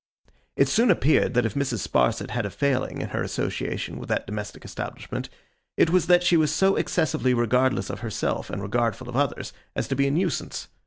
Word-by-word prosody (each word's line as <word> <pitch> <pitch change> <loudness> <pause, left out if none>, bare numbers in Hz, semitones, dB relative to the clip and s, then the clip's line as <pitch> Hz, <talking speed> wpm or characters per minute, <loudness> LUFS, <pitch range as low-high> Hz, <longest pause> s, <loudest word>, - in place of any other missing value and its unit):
It - - +4
soon 230 +2 +3
appeared 155 -7 +3
that 125 -1 +3
if 115 - -1
Mrs. 130 -7 -2
Sparsit 60 -1 +1
had 120 0 -1
a 100 - -2
failing 135 +4 -1
in - - -4
her - - -2
association 60 +1 -3
with - - -9
that - - 0
domestic 105 0 -6
establishment, - - -6 0.5
it 165 - +4
was 185 0 +3
that 175 0 +5
she 175 -1 +4
was 155 -2 +3
so 195 0 +3
excessively 155 -6 +1
regardless 125 +2 +1
of - - -6
herself 115 -3 -2
and 100 - -4
regardful 115 +3 -1
of 120 - -6
others, 140 -1 -1 0.2
as - - -2
to 135 - 0
be 140 +1 +2
a - - +1
nuisance. 175 +2 -2
130 Hz, 200 wpm, -25 LUFS, 115-160 Hz, 0.5 s, that